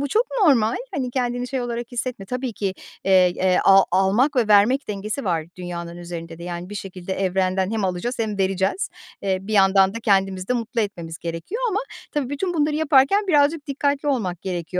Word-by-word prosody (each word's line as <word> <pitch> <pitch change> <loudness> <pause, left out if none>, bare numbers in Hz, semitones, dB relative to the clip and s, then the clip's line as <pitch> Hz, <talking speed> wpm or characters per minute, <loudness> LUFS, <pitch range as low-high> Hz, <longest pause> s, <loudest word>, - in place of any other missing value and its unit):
bu 285 - -1
çok 450 - +2 0.2
normal. 235 -7 +4 0.2
Hani, 255 -3 -2
kendini 245 -1 -2
şey 260 -1 -2
olarak 240 0 -4
hissetme. 240 -4 -4
Tabii 250 0 -3
ki, 195 -2 -3 0.3
eee, 185 -2 +5
eee, 185 -1 +2
a 195 0 +7
almak 200 +10 +2
ve 230 -4 +2
vermek 215 +7 +4
dengesi 210 +5 -4
var 165 -4 0
dünyanın 170 -1 -6
üzerinde 170 -1 -7
de. - - -10
Yani 175 +2 -6
bir - - -6
şekilde 190 -1 -6
evrenden 190 0 0
hem 220 -3 -1
alacağız 185 +7 -2
hem 215 -3 -2
vereceğiz. 195 - 0 0.3
Eee, 190 -1 0
bir 215 +2 -6
yandan 195 0 +4
da 230 - -4
kendimizi 195 -4 +1
de - - +2
mutlu 235 0 -1
etmemiz 170 -6 -4
gerekiyor 170 - -5
ama 420 0 0 0.3
tabii 285 -3 -2
bütün 350 +5 -2
bunları 300 -1 +1
yaparken 315 +7 +3
birazcık 295 -1 +2
dikkatli 285 0 -1
olmak 190 - -1
gerekiyor. 175 -3 -3
210 Hz, 190 wpm, -22 LUFS, 185-260 Hz, 0.3 s, a